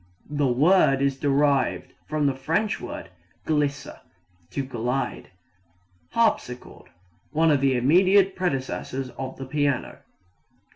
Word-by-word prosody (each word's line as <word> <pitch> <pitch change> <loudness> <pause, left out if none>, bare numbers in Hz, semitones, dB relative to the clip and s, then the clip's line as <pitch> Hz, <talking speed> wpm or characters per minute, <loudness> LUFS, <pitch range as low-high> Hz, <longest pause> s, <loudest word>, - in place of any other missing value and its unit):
The 145 -2 +1
word 140 +2 +4
is 140 0 +1
derived 140 -1 +1
from 155 -1 -1
the 140 - +2
French 165 +11 -1
word 120 -6 -7 0.3
glisser 145 -2 -1 0.5
to 140 - -3
glide. 125 -1 -3 0.8
Harpsichord 170 - -1 0.4
one 160 +1 +2
of 140 -2 +2
the 135 -2 +2
immediate 185 +9 +4
predecessors 135 -5 -3
of 130 -1 -7
the 135 - -6
piano. 145 0 -1
140 Hz, 110 wpm, -25 LUFS, 130-155 Hz, 0.8 s, word